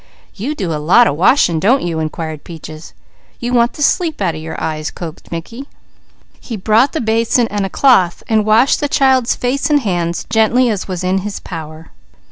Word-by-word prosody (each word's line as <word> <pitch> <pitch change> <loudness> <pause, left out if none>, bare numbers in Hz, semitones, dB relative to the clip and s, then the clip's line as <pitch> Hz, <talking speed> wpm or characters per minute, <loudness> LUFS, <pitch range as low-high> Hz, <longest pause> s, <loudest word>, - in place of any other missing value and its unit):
"You 255 +9 -4
do 185 - -3
a 150 - -3
lot 190 +11 +5
of 145 - 0
washin', 170 - +3
don't 240 - +2
you?" 165 -2 -2
inquired 155 -1 -5
Peaches. 160 -1 -10 0.5
"You 245 +1 -3
want 235 0 +2
the 295 - -3
sleep 330 0 +1
out 185 -5 0
of 155 - -7
your 160 0 -6
eyes," 155 -1 -3
coaxed 165 -3 -9
Mickey. 230 +11 -7 0.7
He 230 - -7
brought 220 +7 +2
the 320 - -1
basin 230 +1 +1
and 200 -1 -2
a - - -9
cloth, 190 -8 +3
washing 220 +3 +3
the 290 - -1
child's 265 -4 +2
face 260 +5 -1
and 295 -1 +3
hands 175 -6 -2
gently 230 +2 +3
as 200 -3 -4
was 185 -2 -4
in 185 +1 +1
his 200 +1 -5
power. 160 -1 -9
205 Hz, 190 wpm, -16 LUFS, 165-245 Hz, 0.7 s, lot